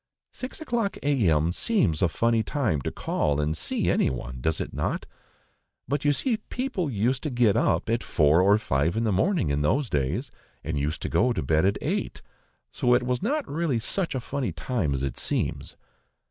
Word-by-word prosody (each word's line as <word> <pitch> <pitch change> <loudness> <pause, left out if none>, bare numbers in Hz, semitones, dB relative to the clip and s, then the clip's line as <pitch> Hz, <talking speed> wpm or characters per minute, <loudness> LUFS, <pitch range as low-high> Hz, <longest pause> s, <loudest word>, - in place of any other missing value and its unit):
Six 255 - -7
o'clock 240 -9 -1
a.m. 85 - +2
seems 130 - +1
a 90 - +3
funny 115 +5 +2
time 110 - -1
to - - -3
call 75 0 -1
and 75 +1 0
see - - -1
any - - +3
one, 60 -1 -6
does 80 +4 0
it - - -4
not? - - -2 0.8
But 140 +3 -1
you 145 - +5
see 225 - 0
people 215 - -3
used 125 +3 0
to 155 - -2
get 120 -5 +3
up 80 +2 +1
at 115 +1 +1
four 75 +3 +3
or 100 +3 +5
five 80 -2 0
in 115 - +1
the 110 - +1
morning 100 - +1
in 70 +1 0
those 130 - +1
days, 75 - -1 0.3
and 75 -2 -2
used 75 +3 -2
to - - -2
go 125 +2 +2
to - - -2
bed 80 +5 +2
at 100 - +2
eight, - - -2 0.5
so 125 - +2
it 125 - +2
was 125 0 -1
not 280 +8 -1
really 155 -4 0
such 165 - -2
a - - 0
funny 130 +1 -3
time 95 - -1
as 65 - -3
it 70 - -3
seems. - - -2
115 Hz, 200 wpm, -26 LUFS, -, 0.8 s, you